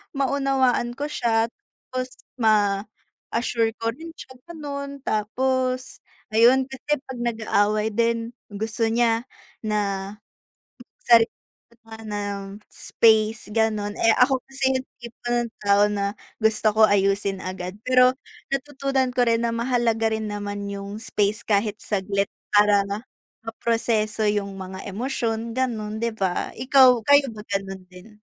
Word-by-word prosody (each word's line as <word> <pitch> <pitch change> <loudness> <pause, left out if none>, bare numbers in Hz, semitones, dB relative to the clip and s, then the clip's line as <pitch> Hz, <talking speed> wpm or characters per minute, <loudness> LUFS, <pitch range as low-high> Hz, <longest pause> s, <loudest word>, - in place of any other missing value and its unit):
maunawaan 270 -3 +1
ko 285 - -3
siya 230 -3 +1
tapos 255 +1 -8 0.3
ma-assure 220 +2 0
ko 230 - 0
rin 325 +7 -10
siya 260 - -11 0.2
ganun, 280 -3 -6
tapos 255 +4 -1 0.3
ayun 240 +4 +5
kasi 265 +3 -2
pag 260 -2 -8
nag-aaway 215 -2 +1
din 230 +1 0 0.2
gusto 225 +2 -1
niya 230 0 +2 0.4
na, 200 -2 -1 0.9
sarili 230 -1 +6 0.6
nga 225 0 -10
ng 205 -1 -5
space 220 -1 +2
ganun, 215 -2 0
eh, 225 0 +4
ako 260 +1 +5
kasi 270 0 -5
yung 260 - -8
tipo 235 -1 -12 0.2
ng 235 - -4
tao 200 0 +4
na 200 -1 -1 0.3
gusto 220 -1 +2
ko 220 - +5
ayusin 195 -1 +1
agad 185 0 -5
pero 255 0 +6 0.4
natutunan 275 -1 0
ko 250 - +4
rin 230 0 +2
na - - 0
mahalaga 230 -2 +1
rin 220 -1 -3
naman 205 -1 -4
yung 200 +1 -6
space 210 0 -1
kahit 210 0 +1
saglit 200 -1 -1 0.2
para 205 -1 +5 0.6
maproseso 225 -1 0
yung 200 -1 -1
mga 190 0 -7
emosyon 230 0 -2
ganun, 220 -5 -2
'di 230 0 -1
ba, 190 -4 -2
ikaw, 255 0 +5
kayo 285 0 +6
ba 210 - -9
ganun 195 -1 -3
din? 180 +3 -14
225 Hz, 130 wpm, -24 LUFS, 205-250 Hz, 0.9 s, sarili